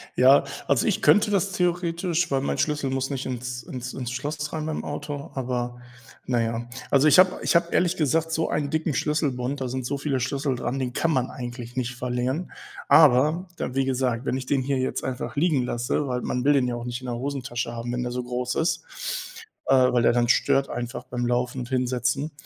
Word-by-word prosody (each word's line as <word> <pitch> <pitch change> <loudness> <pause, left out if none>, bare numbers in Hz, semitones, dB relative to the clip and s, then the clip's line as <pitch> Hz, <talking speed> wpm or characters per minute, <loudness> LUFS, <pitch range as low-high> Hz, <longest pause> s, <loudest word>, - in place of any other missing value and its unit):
Ja, - - +6 0.2
also - - +2
ich - - +1
könnte 210 0 +5
das 195 0 +1
theoretisch, 175 -1 0
weil 135 - +2
mein 140 - -2
Schlüssel 145 -3 0
muss 135 +1 -1
nicht 135 -2 -3
ins 125 -1 -4
ins 125 +1 -6
ins 125 -2 -4
Schloss 150 +4 -4
rein 155 -1 -2
beim 155 - -3
Auto, 145 -1 -5
aber 125 -2 -3 0.5
na 120 -2 +2
ja. 115 +1 -2 0.2
Also 140 +2 +5
ich 150 - +6
habe 185 0 +5
ich - - +1
habe 170 0 +3
ehrlich 180 +1 +2
gesagt 160 +1 +1
so 160 0 0
einen 145 -2 -1
dicken 160 -1 0
Schlüsselbund, 140 -3 -1
da 130 - -1
sind 130 0 -3
so 140 - -2
viele 140 -1 -1
Schlüssel 135 +1 -1
dran, 120 +2 -3
den 125 -2 -2
kann 165 - +1
man 130 -3 0
eigentlich 120 -1 -7
nicht 125 0 -2
verlieren, 125 +7 -2 0.4
aber 155 +4 +5
da 125 - -3
wie 135 0 +2
gesagt, 130 -2 0
wenn 130 - 0
ich 130 - -5
den 135 0 +1
hier 135 +1 0
jetzt 130 - -2
einfach 130 -1 -4
liegen 145 -3 +2
lasse, 120 +4 -1
weil 125 -1 -1
man 125 0 -2
will 145 - +5
den 130 -3 +3
ja 120 - -2
auch 120 0 -6
nicht 120 +1 -4
in 130 - -7
der 120 - -2
Hosentasche 125 -3 -3
haben, 120 +1 -4
wenn 125 - -1
der 125 - -3
so 125 0 -3
groß 125 0 -2
ist, 165 0 0 0.8
äh, - - +4 0.2
weil 120 - +3
der - - +5
dann 120 0 +2
stört 135 +2 +3
einfach 120 +1 -5
beim 120 -1 -3
Laufen 125 +1 0
und 125 - -5
Hinsetzen. 125 +3 0
130 Hz, 220 wpm, -25 LUFS, 125-150 Hz, 0.8 s, Ja